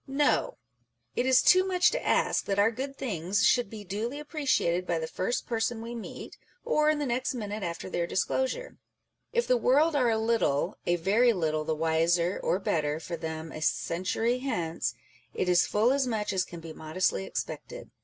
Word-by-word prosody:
No: 290 - +1 0.6
it 250 - 0
is 260 -1 +5
too 370 +1 +6
much 365 -1 +3
to - - -2
ask - - +1
that 195 - -1
our 205 +3 +4
good 270 +4 -5
things 200 -4 0
should 245 -5 +3
be 215 -1 -8
duly 220 +8 -4
appreciated 260 - 0
by 170 - 0
the 160 - -2
first 185 +8 -2
person 225 0 -1
we 230 +1 -6
meet, 230 -2 -8 0.3
or 305 -11 +3
in 305 - +2
the 295 - -1
next 255 +1 -1
minute 210 -2 -4
after 170 -2 -4
their 175 -2 -2
disclosure; 265 - -1 0.5
if 475 0 +1
the 250 - +3
world 290 +7 +3
are 250 -4 +3
a 225 - +2
little, 220 -8 +1
a 175 - +3
very 215 +8 +3
little, 155 -5 -1
the 160 - 0
wiser 165 +3 +1
or - - +1
better 155 -5 -1
for 170 +1 -5
them 160 0 -5
a 155 - -7
century 185 +10 0
hence, 175 -11 -2 0.4
it 185 - -1
is 180 -1 +4
full 220 +4 +3
as 275 -2 +1
much 215 -4 -1
as 185 -1 +1
can 170 -1 -10
be 160 -1 -8
modestly 155 - -1
expected - - -6
215 Hz, 190 wpm, -28 LUFS, 170-260 Hz, 0.6 s, too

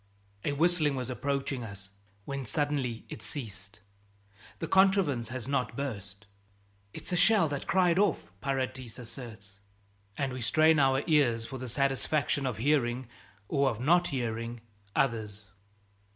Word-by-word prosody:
A 145 - 0
whistling 155 -1 +3
was 130 -1 -3
approaching 135 0 -2
us 100 -3 -9 0.3
when 140 -1 -4
suddenly 135 -3 -1
it - - -8
ceased. 105 -6 -7 0.8
The 165 - -4
contrivance 190 - +3
has 120 -1 -5
not 140 -2 -1
burst. 100 -7 -5 0.7
"It's - - -8
a - - +2
shell 205 -1 +5
that 145 -1 -4
cried 180 -2 +3
off," 205 - +1
Paradis 130 -3 -3
asserts. 110 -5 -10 0.6
And 135 -2 -1
we 130 - -5
strain 155 +6 +4
our 135 0 +3
ears 130 -8 +3
for 130 +3 -7
the 130 -1 -5
satisfaction 140 +2 +1
of 120 -6 -2
hearing 125 -1 +1 0.4
or 140 -1 +2
of 115 -4 -4
not 175 +7 +4
hearing 115 -3 -3 0.3
others. 105 -5 0
130 Hz, 135 wpm, -30 LUFS, 115-145 Hz, 0.8 s, shell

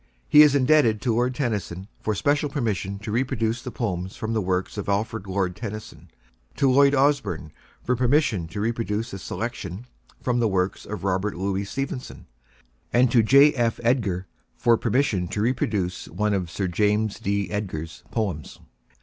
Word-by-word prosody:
He 150 - +8
is 150 -2 +6
indebted 130 -5 +4
to 120 - +1
Lord 125 +2 +1
Tennyson 100 -8 -3
for 110 - -1
special 145 +6 +1
permission 105 -8 -2
to 105 +1 -6
reproduce 115 -1 0
the 125 - -6
poems 95 -7 -3
from 110 +1 -3
the 110 - +1
works 95 0 -1
of 105 -1 -4
Alfred, 105 0 -1
Lord 95 -2 -1
Tennyson; 110 0 -8 0.5
to 135 -2 +3
Lloyd 140 +2 +5
Osbourne 140 - +1 0.3
for 125 - +1
permission 125 - +2
to 100 +5 -6
reproduce 115 0 -2
the 95 - -6
selection 95 +4 -5 0.3
from 125 -1 0
the 115 - +3
works 95 -2 -1
of 105 -2 -6
Robert 95 0 0
Louis 95 +2 -2
Stevenson; 130 +3 -5 0.7
and 125 0 +4
to 120 - +5
J. 140 +6 +6
F. 120 -4 0
Edgar 110 -7 +1 0.3
for 120 -1 +3
permission 115 -6 0
to 105 - -4
reproduce 105 -6 -1
one 105 -1 -1
of 90 -4 -1
Sir 95 +4 -2
James 105 +3 +1
D. 100 -2 -1
Edgar's 80 -6 -5
poems. 95 - -3
110 Hz, 165 wpm, -24 LUFS, 95-125 Hz, 0.7 s, He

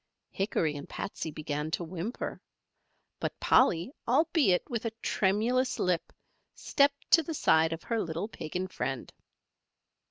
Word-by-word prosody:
Hickory 165 -6 0
and 145 - -8
Patsey 195 -5 -4
began 150 0 -3
to 175 - -2
whimper. 180 +7 -5 0.8
But - - -3
Polly, 170 +8 +4 0.2
albeit 310 - +3
with 235 -5 -3
a 230 - 0
tremulous 230 +6 +1
lip, 180 -2 0 0.4
stepped 280 0 +1
to 330 - +8
the 320 +1 -5
side 160 - +4
of 165 0 -5
her 230 -2 -1
little 165 +4 -3
Pagan 180 -3 -4
friend. 135 -7 -4
185 Hz, 130 wpm, -30 LUFS, 160-240 Hz, 0.8 s, to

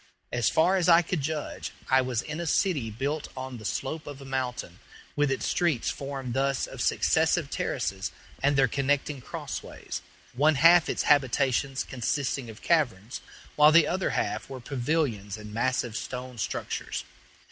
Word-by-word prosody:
As 120 -2 +2
far 180 +4 +3
as 180 -1 +2
I 170 0 +7
could 170 -2 -2
judge, 150 +1 -4
I 130 0 +5
was 125 -3 -1
in 155 +1 -5
a 170 - -3
city 150 - +1
built 140 +7 -3
on 130 -2 -6
the 110 - -10
slope 150 +8 -3
of 145 -2 -7
a 135 - -10
mountain, 130 -9 -3 0.4
with 145 -1 +2
its 135 - -1
streets 165 -9 +1
formed 135 -3 -5
thus 135 +1 +1
of - - -8
successive - - +2
terraces - - -2 0.3
and 140 +1 +3
their 135 -1 +5
connecting 140 +2 0
cross - - -5
ways, - - -7 0.3
one 150 +5 +3
half 165 +4 +6
its - - 0
habitations 135 -1 +2
consisting 130 0 -2
of 110 0 -12
caverns, 125 - 0 0.3
while 150 +1 +7
the 165 -1 +7
other 185 +4 0
half - - -2
were 135 -1 -6
pavilions 120 -6 -1
and 105 0 -10
massive 120 0 0
stone 125 0 -5
structures. - - -3
135 Hz, 165 wpm, -27 LUFS, 125-150 Hz, 0.4 s, I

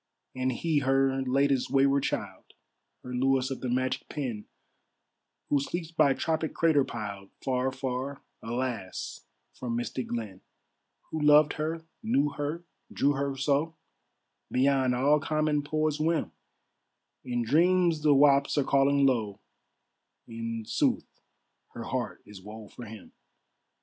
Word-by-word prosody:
And 130 0 0
he 155 +4 0
her 135 0 +2
latest 135 0 +1
wayward 140 0 +3
child, - - -4 0.5
Her 125 - -7
Louis 130 +1 +1
of 135 - -5
the 130 - -2
magic 130 +1 -1
pen, 120 -8 -4 1.0
Who 145 - +3
sleeps 165 +4 -4
by 140 -4 +3
tropic 160 +1 -1
crater 160 -4 +4
piled, 100 -5 -6
Far, 130 0 0
far, 130 +1 -4 0.2
alas, 115 -5 -4 0.3
from 120 -2 -4
misted 120 +2 -3
glen; 110 -6 -5 0.7
Who 160 - -3
loved 150 0 +6
her, 160 +1 -3 0.2
knew 150 -11 +2
her, 145 +4 -4 0.3
drew 145 -9 +2
her 140 -1 -2
so, 145 +4 0 0.8
Beyond 130 -1 +2
all 145 +4 +3
common 155 -1 0
poet's 155 +1 -1
whim; 160 +1 0 0.9
In 120 -1 -1
dreams 170 +5 +3
the 150 -1 +4
whaups 140 +1 +4
are 145 - +4
calling 140 +1 +3
low, 110 -7 0 0.9
In 115 -1 -5
sooth - - +1 0.7
her - - -6
heart - - -4
is 105 -2 -12
woe 105 +1 -10
for 120 - -10
him. 110 -1 -11
135 Hz, 130 wpm, -28 LUFS, 125-150 Hz, 1.0 s, loved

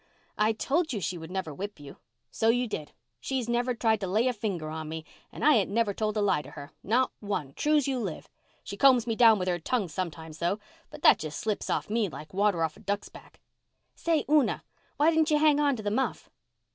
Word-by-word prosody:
"I 215 +1 +2
told 305 +7 0
you 215 - -2
she 185 -1 -2
would 160 0 -9
never 185 -4 -4
whip 200 +3 -6
you." 145 -1 -11 0.3
"So 225 - +1
you 245 +2 +3
did. 155 -8 -5 0.3
She's 260 -3 -2
never 240 +1 0
tried 220 -2 +2
to 195 - -3
lay 215 +7 +2
a 250 - +1
finger 195 -8 -3
on 155 -1 -5
me 160 0 -6 0.3
and - - -4
I 305 - +7
ain't 205 -8 +2
never 215 0 +1
told 215 +1 -2
a - - +2
lie 195 -7 +2
to - - -12
her—not 225 - -2
one, 175 -10 -3
true's 295 - +2
you 265 -2 0
live. 190 -9 -5 0.4
She - - -7
combs 255 -3 +5
me 230 -2 -1
down 225 -2 +6
with 185 -1 -3
her 175 -1 0
tongue 205 +2 -1
sometimes 160 -2 -5
though, 175 +4 0 0.3
but 300 0 -12
that - - +7
just 155 -1 -5
slips 215 -2 -2
off - - -1
me 215 -2 0
like 150 -1 -10
water 200 -3 +2
off 160 -1 -2
a - - -15
duck's 200 0 -3
back. - - -16 0.5
Say, 330 -3 0
Una, 295 -4 +2 0.3
why 300 +3 +4
didn't 320 0 +3
you 300 - +4
hang 300 -1 +4
on 285 -2 +3
to 215 - -7
the 205 - -1
muff?" 265 +5 -2
215 Hz, 230 wpm, -28 LUFS, 180-255 Hz, 0.5 s, I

